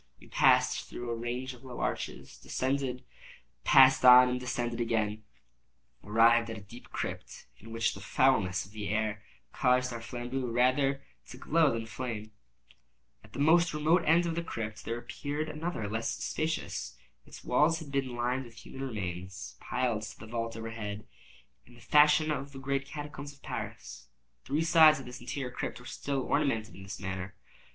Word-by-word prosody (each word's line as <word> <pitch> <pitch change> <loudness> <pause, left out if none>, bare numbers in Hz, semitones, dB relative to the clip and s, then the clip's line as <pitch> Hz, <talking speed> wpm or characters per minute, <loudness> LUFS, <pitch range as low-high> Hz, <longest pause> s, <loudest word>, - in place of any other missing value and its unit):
We - - -16
passed - - +3
through 120 -1 -5
a - - -1
range 120 +3 -4
of 125 +1 -16
low 125 -2 -8
arches, - - -4
descended, 130 -1 -2 0.6
passed 130 -1 +7
on, 125 0 +9
and 125 0 -1
descending 120 -2 -2
again, 110 -2 -1 0.8
arrived 115 +2 +4
at 110 - -5
a - - -9
deep 115 +5 -13
crypt, - - -6
in 115 +2 -12
which 115 0 0
the - - -9
foulness 110 -9 +2
of 95 - -16
the 105 -3 -5
air 105 0 -1 0.3
caused 125 -1 +2
our 115 - -6
flambeaux 125 +2 -4
rather 130 +3 +2 0.2
to 125 - -10
glow 155 +2 +3
than 115 -1 -3
flame. 110 -2 -5 0.9
At - - -18
the - - -8
most 165 +2 +4
remote 160 +4 +3
end 170 +2 +5
of 170 - -1
the 170 - -1
crypt 110 -8 -5
there 115 - -2
appeared 145 +5 -4
another 155 -7 -3
less 110 +2 -2
spacious. 160 0 -3 0.3
Its - - -12
walls 150 +6 +3
had 160 -4 -9
been 135 -3 -1
lined 125 +2 -1
with 115 -1 -14
human 135 - -9
remains, 95 -6 -5
piled 125 -4 -1
to 110 0 -8
the - - -9
vault 115 0 -4
overhead, 110 -2 -6 0.6
in 120 - -17
the - - -16
fashion 150 +3 +5
of 140 -1 -4
the - - -8
great 140 +1 -2
catacombs 145 -1 -7
of 140 - -23
Paris. - - -7 0.4
Three 150 +4 0
sides 160 -2 +7
of 135 - -9
this 125 0 -9
interior 125 +1 -4
crypt 125 - -4
were 125 - -14
still 140 +2 -3
ornamented 125 -8 0
in - - -11
this 95 0 -7
manner. 95 0 -5
125 Hz, 175 wpm, -30 LUFS, 115-140 Hz, 0.9 s, on